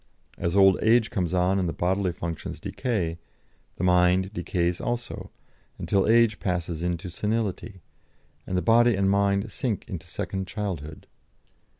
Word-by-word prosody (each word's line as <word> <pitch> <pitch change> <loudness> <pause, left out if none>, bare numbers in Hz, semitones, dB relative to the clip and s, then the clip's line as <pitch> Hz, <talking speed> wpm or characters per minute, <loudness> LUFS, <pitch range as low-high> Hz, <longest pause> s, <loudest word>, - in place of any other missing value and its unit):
As 85 +2 -1
old 95 -1 +6
age 115 0 +3
comes 90 -3 -1
on 90 +1 +2
and 90 -3 0
the - - -3
bodily 95 +1 0
functions 85 -1 -6
decay, 90 -10 -2 0.6
the - - -5
mind 90 +2 +3
decays 85 -1 -1
also, 120 0 -4 0.5
until 100 -1 +1
age 115 -1 +4
passes 85 -3 -2
into 90 0 -2
senility, 105 0 -3 0.7
and 90 0 -1
body 120 0 +5
and 95 0 +2
mind 100 +1 +1
sink 115 -2 -3
into 90 -7 -7
second 95 -1 -4
childhood. 90 -6 -5
95 Hz, 135 wpm, -26 LUFS, 90-105 Hz, 0.7 s, old